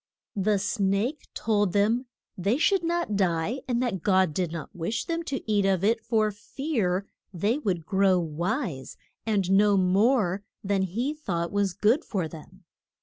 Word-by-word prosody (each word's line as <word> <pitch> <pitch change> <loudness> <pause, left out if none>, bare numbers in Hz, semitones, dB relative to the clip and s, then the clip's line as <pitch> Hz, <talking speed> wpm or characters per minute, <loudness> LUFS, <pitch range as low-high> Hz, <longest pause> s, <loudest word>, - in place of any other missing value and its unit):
The 205 +1 +2
snake 205 +6 -1
told 205 -4 +1
them 225 +5 +2 0.3
they 200 +5 +1
should 380 +3 +2
not 340 -10 -1
die, 185 +5 0
and 245 0 0
that 200 -8 -2
God 185 -4 +3
did 175 0 -1
not 165 -3 -7
wish 175 +6 -2
them 335 -1 -2
to 270 -5 -4
eat 205 -2 +2
of 190 -2 +1
it 225 +2 +2
for 220 -2 +1
fear 205 - -2 0.3
they 205 - 0
would 180 - -2
grow 190 0 +3
wise, 170 - -3 0.3
and 195 -4 +1
know 200 +1 +5
more 195 +1 +2 0.2
than 195 -1 +1
he 230 - -1
thought 175 - -3
was 200 -2 0
good 220 - +2
for 185 -6 -2
them. 175 +4 -13
200 Hz, 160 wpm, -27 LUFS, 185-230 Hz, 0.3 s, know